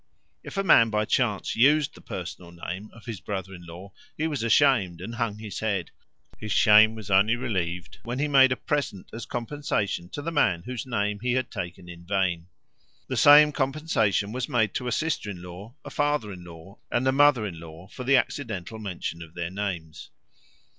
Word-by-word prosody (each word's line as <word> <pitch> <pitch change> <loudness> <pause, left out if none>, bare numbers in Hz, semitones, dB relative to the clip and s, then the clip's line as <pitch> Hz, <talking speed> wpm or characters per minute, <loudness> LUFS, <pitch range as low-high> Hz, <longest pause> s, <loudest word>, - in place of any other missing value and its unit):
If - - -9
a 195 - +1
man 115 -11 +6
by 105 0 0
chance 105 -4 0
used 145 +5 +4
the - - -15
personal 90 -1 -7
name 90 +4 -7
of 115 - -16
his 115 -6 -6
brother 95 0 -5
in 85 -2 -11
law, 90 +4 -10 0.3
he 155 - -1
was 150 -6 -2
ashamed 115 - +3
and 115 - -7
hung 115 -3 -2
his 105 -3 -7
head. 100 -6 -2 0.5
His 110 -1 -6
shame 110 +1 +6
was 110 -3 -8
only 100 +5 +4
relieved 90 -8 -3
when 120 +2 -4
he 140 - 0
had 150 - -4
made 135 -2 +6
a - - +2
present 140 - -3
as 115 0 -7
compensation 115 -9 -2
to 145 - -6
the 165 - -3
man 95 - +2
whose 125 +1 -6
name 105 -4 -1
he 125 +3 0
had 130 -1 -1
taken 90 -4 -6
in 85 -1 -11
vain. 90 -2 -1 0.6
The - - -2
same 150 +1 +8
compensation 135 - 0
was 125 +1 -3
made 110 -3 +1
to 125 0 -3
a - - -1
sister 155 -8 -1
in 90 -3 -7
law, 95 +7 -10
a - - -8
father 145 -7 0
in 90 -1 -10
law, 85 +3 -13
and 125 +2 0
a - - +5
mother 140 -4 +4
in 85 -5 -6
law 85 +2 -11
for 125 - -8
the 135 +1 +4
accidental 110 -5 -3
mention 90 -5 -5
of 80 0 -11
their 85 0 -4
names. 90 -6 -5
110 Hz, 200 wpm, -26 LUFS, 90-130 Hz, 0.6 s, same